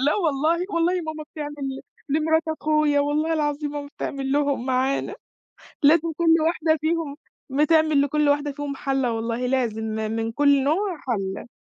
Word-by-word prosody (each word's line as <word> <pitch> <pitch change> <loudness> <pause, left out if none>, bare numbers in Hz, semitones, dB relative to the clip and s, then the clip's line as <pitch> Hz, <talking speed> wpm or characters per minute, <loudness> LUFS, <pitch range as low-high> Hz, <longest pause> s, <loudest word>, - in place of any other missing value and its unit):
لأ 295 - +3
والله. 330 0 +1
والله 335 +2 +2
ماما 310 -1 -6
بتعمل 295 -1 -5
ل 265 0 -5 0.3
لمرات 320 +2 +2
أخويا. 305 -2 +2
والله 300 +3 0
العظيم 295 -1 -1
ماما 290 -1 -5
بتعمل 270 -1 -3
لهم 280 -3 0
معانا. 260 +1 0 0.7
لازم 325 +3 +5
كُلّ 330 -1 +4
واحدة 320 -1 +1
فيهم، 315 -3 -1 0.3
بتعمل 305 +1 +3
لكل 290 +1 +1
واحدة 290 0 +1
فيهم 285 0 -5
حلّة 270 -3 -1
والله 230 +2 -2
لازم، 240 -4 0
م 220 0 -2
من 225 0 -2
كُلّ 285 +1 +3
نوع 355 +4 0
حلّة. 195 -2 -3
290 Hz, 155 wpm, -24 LUFS, 270-315 Hz, 0.7 s, لازم